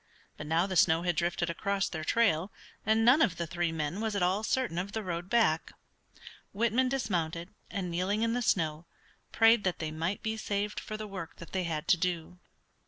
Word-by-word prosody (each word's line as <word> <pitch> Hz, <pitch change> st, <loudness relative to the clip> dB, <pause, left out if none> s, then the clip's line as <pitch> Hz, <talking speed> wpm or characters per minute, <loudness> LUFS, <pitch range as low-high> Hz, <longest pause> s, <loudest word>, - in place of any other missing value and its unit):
But 150 Hz, -, -8 dB
now 165 Hz, +3 st, +2 dB
the 190 Hz, -1 st, -4 dB
snow 165 Hz, 0 st, +4 dB
had 175 Hz, -2 st, 0 dB
drifted 170 Hz, +1 st, 0 dB
across 200 Hz, +3 st, -1 dB
their 160 Hz, -2 st, -5 dB
trail, 190 Hz, -2 st, +2 dB, 0.4 s
and 220 Hz, +1 st, +3 dB
none 260 Hz, +6 st, +6 dB
of 185 Hz, -, +2 dB
the 170 Hz, -, -2 dB
three 170 Hz, 0 st, -1 dB
men 160 Hz, +4 st, -3 dB
was 220 Hz, -2 st, -1 dB
at 200 Hz, -, +1 dB
all 185 Hz, +4 st, +2 dB
certain 225 Hz, -5 st, 0 dB
of 195 Hz, +3 st, -4 dB
the 220 Hz, -, -2 dB
road 175 Hz, -1 st, -4 dB
back. 190 Hz, -9 st, +2 dB, 0.8 s
Whitman 235 Hz, +4 st, +2 dB
dismounted, 175 Hz, -8 st, -2 dB, 0.2 s
and 185 Hz, -3 st, -3 dB
kneeling 190 Hz, +5 st, 0 dB
in 230 Hz, 0 st, +1 dB
the 245 Hz, -, 0 dB
snow, 160 Hz, -6 st, 0 dB, 0.4 s
prayed 225 Hz, -1 st, +5 dB
that 185 Hz, -2 st, 0 dB
they 155 Hz, -1 st, -4 dB
might 165 Hz, +5 st, -3 dB
be 220 Hz, 0 st, -2 dB
saved 210 Hz, -1 st, -2 dB
for 215 Hz, -, -6 dB
the 215 Hz, -, -5 dB
work 190 Hz, -5 st, -7 dB
that 170 Hz, -, -11 dB
they 185 Hz, -2 st, -1 dB
had 155 Hz, -2 st, -3 dB
to 180 Hz, -, +6 dB
do. 180 Hz, 0 st, -3 dB
185 Hz, 205 wpm, -30 LUFS, 170-215 Hz, 0.8 s, none